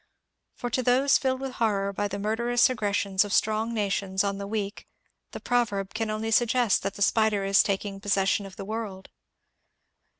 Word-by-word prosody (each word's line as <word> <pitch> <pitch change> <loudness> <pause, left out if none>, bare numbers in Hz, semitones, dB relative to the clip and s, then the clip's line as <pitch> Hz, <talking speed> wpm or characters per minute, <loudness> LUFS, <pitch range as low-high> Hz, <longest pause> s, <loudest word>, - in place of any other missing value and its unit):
For 245 - -5
to 255 - +1
those 255 +3 +3
filled 260 -1 -1
with 270 -1 -4
horror 200 -3 +1
by 205 +1 -1
the 200 0 -5
murderous 235 +4 +2
aggressions 200 -4 0
of 205 - -7
strong 220 +2 +1
nations 200 -3 -1
on 200 0 -2
the 200 - -5
weak 205 -1 -4 0.4
the - - -8
proverb 210 -6 -1
can 220 0 -2
only 215 +1 -3
suggest 240 -1 +3
that 195 - -4
the 200 - 0
spider 215 -1 +2
is 195 0 +4
taking 195 0 -2
pos 200 0 0
session 195 +1 +1
of 190 - -13
the 195 - -7
world. 210 -3 -6
210 Hz, 180 wpm, -26 LUFS, 195-230 Hz, 0.4 s, is